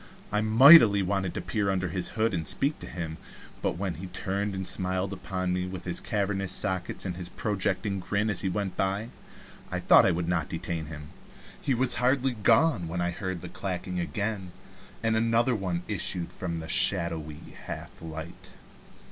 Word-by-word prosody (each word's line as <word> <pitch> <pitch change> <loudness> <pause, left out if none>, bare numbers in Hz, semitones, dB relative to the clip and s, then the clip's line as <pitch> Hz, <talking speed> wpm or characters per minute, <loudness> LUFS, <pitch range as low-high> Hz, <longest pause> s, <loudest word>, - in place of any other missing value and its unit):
I 105 - +1
mightily 110 -2 +8
wanted, 95 -1 -1
to - - -2
peer 105 -2 -1
under 90 -2 0
his 90 +2 -1
hood 110 0 +2
and 80 -3 -1
speak 145 +2 +3
to - - -8
him, 80 -2 -5 0.4
but - - -1
when 95 -1 -2
he 95 +3 -7
turned 100 +2 -2
and 95 -1 -3
smiled 95 +1 -2
upon 90 -1 -3
me 90 0 -1
with 95 -1 -7
his 90 -2 0
cavernous 95 -2 -1
sockets 95 -2 -1
and 90 -2 -3
his 90 -1 -4
projecting 100 0 -1
grin 100 +4 -1
as 100 - +2
he 95 - 0
went 95 0 -3
by, 100 +4 -1 0.6
I - - -2
thought - - +6
I - - +4
would 85 0 -2
not 85 -3 0
detain 85 -2 -4
him. 75 0 -9 0.5
He 135 -3 +1
was 125 +1 +3
hardly 130 +1 +2
gone 110 - +3
when 85 +2 -4
I 85 0 0
heard 95 -1 -4
the 90 - -6
clacking 90 -1 -4
again, 100 0 -3 0.5
and 110 0 +2
another 115 +2 +2
one 90 -5 -2
issued 95 -4 -2
from 85 -3 -4
the 80 0 -6
shadowy 80 -5 0
half - - -7
light. 80 +1 -8
95 Hz, 180 wpm, -28 LUFS, 90-105 Hz, 0.6 s, mightily